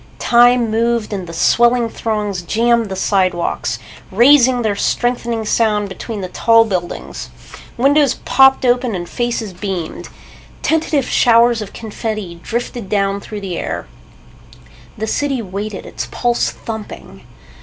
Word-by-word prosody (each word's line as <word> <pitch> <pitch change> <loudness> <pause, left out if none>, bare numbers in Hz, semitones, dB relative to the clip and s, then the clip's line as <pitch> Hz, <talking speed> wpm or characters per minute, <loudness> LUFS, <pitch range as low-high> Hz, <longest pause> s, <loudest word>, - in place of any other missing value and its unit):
Time 240 -1 +4
moved 230 -1 0
and 190 -3 -4
the - - -7
swelling 240 +7 +3
throngs 210 -4 -3
jammed 230 +4 +1
the 190 - -4
sidewalks, 185 -10 0 0.3
raising 250 +3 +5
their 210 -2 0
strengthening 235 0 -1
sound 210 -2 +1
between 200 +2 -6
the 185 - -4
tall 230 +4 +4
buildings. 180 -5 -4 0.5
Windows 280 +2 +3
popped 265 0 +5
open 245 -2 +1
and 175 -1 -5
faces 235 -3 -3
beamed. 180 -3 -5 0.5
Tentative 315 -4 +1
showers 235 -1 +4
of 205 - -7
confetti 215 -5 -5
drifted 235 -2 -4
down 200 -1 0
through 210 0 -7
the 185 -3 -4
air. - - -4 1.1
The 220 - -2
city 275 +3 -1
waited, 200 -1 -5
its - - -6
pulse 240 0 0
thumping. 220 -2 -8
225 Hz, 130 wpm, -17 LUFS, 200-240 Hz, 1.1 s, raising